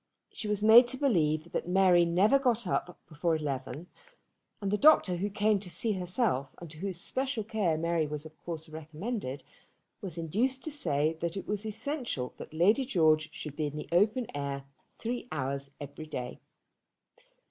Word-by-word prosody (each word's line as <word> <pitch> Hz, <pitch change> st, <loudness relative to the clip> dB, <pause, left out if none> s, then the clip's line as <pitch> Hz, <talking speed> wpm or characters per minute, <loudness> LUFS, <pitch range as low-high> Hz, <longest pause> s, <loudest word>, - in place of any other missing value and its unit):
She 215 Hz, -, -5 dB
was 210 Hz, 0 st, -1 dB
made 230 Hz, +3 st, +9 dB
to 260 Hz, -, -2 dB
believe 165 Hz, -, +1 dB
that -, -, -3 dB
Mary 180 Hz, -1 st, +5 dB
never 195 Hz, +11 st, +4 dB
got 240 Hz, -4 st, +1 dB
up 180 Hz, 0 st, -2 dB
before 165 Hz, +1 st, 0 dB
eleven; 140 Hz, 0 st, -4 dB, 0.7 s
and 200 Hz, -2 st, -2 dB
the -, -, +3 dB
doctor 280 Hz, -, +6 dB
who 200 Hz, +4 st, -1 dB
came 205 Hz, +1 st, +2 dB
to 190 Hz, -2 st, -7 dB
see 220 Hz, +5 st, +1 dB
herself 180 Hz, -, -1 dB
and 170 Hz, -3 st, -10 dB
to 155 Hz, -, -12 dB
whose 190 Hz, -2 st, -3 dB
special 260 Hz, +2 st, -2 dB
care 200 Hz, -7 st, 0 dB
Mary 165 Hz, -1 st, 0 dB
was 150 Hz, +1 st, -5 dB
of 155 Hz, 0 st, -11 dB
course 160 Hz, -2 st, -5 dB
recommended, 155 Hz, -, -5 dB, 0.6 s
was 180 Hz, -4 st, -5 dB
induced 230 Hz, -, 0 dB
to 315 Hz, -, -3 dB
say 160 Hz, -, 0 dB
that 170 Hz, +3 st, -2 dB
it 195 Hz, -, -6 dB
was 210 Hz, +1 st, -2 dB
essential 220 Hz, -, -3 dB
that -, -, -9 dB
Lady 195 Hz, -, +3 dB
George 160 Hz, -, +3 dB
should 150 Hz, -3 st, -7 dB
be 150 Hz, 0 st, -1 dB
in 145 Hz, -, -7 dB
the 150 Hz, -, -6 dB
open 210 Hz, +8 st, +3 dB
air 140 Hz, -1 st, -3 dB, 0.3 s
three 240 Hz, +1 st, -4 dB
hours 140 Hz, -1 st, -3 dB
every 145 Hz, +2 st, -8 dB
day. 125 Hz, -5 st, -5 dB
175 Hz, 175 wpm, -30 LUFS, 155-215 Hz, 0.7 s, made